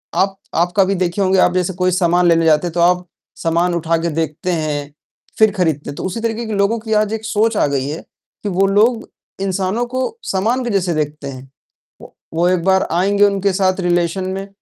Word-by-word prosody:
आप 195 0 +1 0.2
आप 175 +2 +1
कभी 195 0 +3
देखे 180 +2 -1
होंगे 190 0 +3
आप 180 - +4
जैसे 185 0 0
कोई 180 +1 0
सामान 175 0 +2
लेने 165 -1 +3
जाते 155 +2 +3
हैं - - -4
तो 175 - -2
आप 180 +1 +3 0.4
सामान 170 +2 +1
उठा 165 0 0
के 170 +1 -1
देखते 160 +3 -2
हैं, 150 -3 -3 0.5
फिर 215 -1 +6
खरीदते 160 -8 -1
हैं, 145 - -6
तो - - -6
उसी 190 +5 -3
तरीके 230 0 -2
की 220 - -4
लोगों 200 +3 +1
की 220 0 -3
आज 215 0 +1
एक 220 0 -4
सोच 220 0 +1
आ - - +3
गई 140 -1 -1
है 155 - -5 0.4
कि 205 - -2
वो 190 +1 +2
लोग 220 +4 +2 0.3
इंसानों 195 +4 -1
को 260 - -2
सामान 225 +7 0
के 240 - -3
जैसे 185 -4 0
देखते 150 -1 -3
हैं। 130 -1 -9 0.5
वो - - -14 0.2
वो 170 +2 +2
एक 180 -2 +1
बार 190 0 +2
आएँगे 200 +4 +3
उनके 200 -1 +1
साथ 185 0 +1
रिलेशन 175 +1 0
में, 195 +1 -5
185 Hz, 220 wpm, -18 LUFS, 170-200 Hz, 0.5 s, फिर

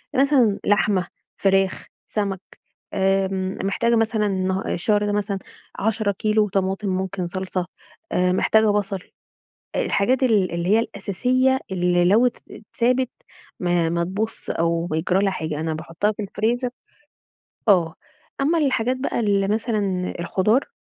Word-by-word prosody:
مثلًا 260 -6 +3
لحمة، 205 -2 +2 0.3
فراخ، 195 -1 +1 0.2
سمك، 200 -3 -2 0.5
آمم، 190 -1 0
محتاجة 230 +4 +1
مثلًا 220 -1 +1
النها 190 -1 -1
الشهر 205 +3 +1
ده 205 - 0
مثلًا 205 -1 -1 0.4
10 215 -1 +1
كيلو 215 +1 +1
طماطم 195 +1 -1
ممكن 185 -1 -2
صلصة، 185 0 -3 0.5
آآ، 180 0 +2
محتاجة 220 +3 +3
بصل، 200 -1 0 0.8
آآ، - - +1
الحاجات 255 - +1
ال 205 -8 +3
اللي 170 +1 -2
هي 215 +2 +5
الأساسية 250 +6 +1
اللي 175 -1 +2
لو 220 +7 +5
ات 245 - -1
اتسابت 245 +4 -1 0.5
ما 175 -2 +1
ما 170 +1 0
تبوظش 210 +5 -4
أو 170 +1 0
بيجرى 175 +3 0
لها 195 - +2
حاجة، 160 -4 -3
أنا 160 0 -2
باحطها 165 +6 -1
في 210 - -6
الفريزر 235 +5 -1 1.0
آه، 175 -5 +4 0.5
أمّا 325 +4 +2
الحاجات 255 -4 +1
بقى 260 - -2
اللي 200 -3 +2
مثلًا 205 -4 -1
الخضار 210 - +1
200 Hz, 135 wpm, -22 LUFS, 185-220 Hz, 1.0 s, هي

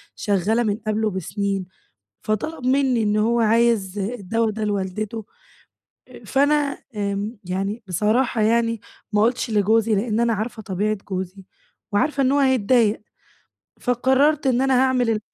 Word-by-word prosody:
شغالة 205 +4 +1
من 210 -1 0
قبله 215 0 +1
بسنين. 195 +1 -3 0.6
فطلب 250 +7 -3
منّي 260 -3 +2
إن 210 0 +1
هو 235 +2 +2
عايز 225 -3 +2
الدوا 225 +1 -1
ده 215 +1 -4
لوالدته، 210 +2 -3 1.0
فأنا 285 +1 +2 0.2
آمم، 205 +2 -3
يعني 195 +5 -3
بصراحة 215 +6 +1
يعني 230 0 +1 0.3
ما 210 - +3
قُلتش 240 +1 +1
لجوزي 215 +1 +3
لأن 215 +2 0
أنا 235 -1 +2
عارفة 220 +1 -4
طبيعة 210 +1 -1
جوزي، 190 0 -5 0.5
وعارفة 275 +7 +1
إن 260 - +3
هو 285 - +3
هيتضايق، 240 -5 +3 0.8
فقررت 265 +4 +2
إن 255 0 +2
أنا 270 0 +2
هاعمل 255 -3 +2
ال 215 -1 +1
220 Hz, 135 wpm, -22 LUFS, 205-245 Hz, 1.0 s, ما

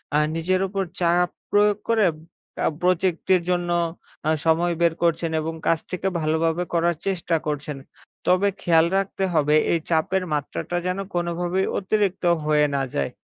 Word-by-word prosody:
আ - - +5 0.2
নিজের 185 +3 0
উপর 195 0 -2 0.2
চাপ 175 0 +3 0.2
প্রয়োগ 205 0 +4
করে 220 -3 +4 0.5
কা - - -1 0.2
প্রজেক্ট 180 -1 +1
এর 180 - +1
জন্য 175 -1 0 0.6
আ - - +3 0.2
সময় 170 +2 +3
বের 170 -1 +4
করছেন, 165 0 +1
এবং 160 +1 -3
কাজটিকে 185 +3 0
ভালোভাবে 160 +2 +1
করার 170 0 +2
চেষ্টা 175 -3 0
করছেন। 150 -1 -3 0.5
তবে 185 +3 +4
খেয়াল 165 -1 +4
রাখতে 195 0 -2
হবে 150 -1 +3 0.2
এই 170 - +2
চাপের 185 +3 +1
মাত্রাটা 150 +4 -3
যেন 180 +1 -1 0.2
কোনভাবেই 175 +2 -1
অতিরিক্ত 195 -1 0 0.2
হয়ে 150 -1 +3
না 135 - +1
যায়। 70 - -1
175 Hz, 150 wpm, -23 LUFS, 160-185 Hz, 0.6 s, আ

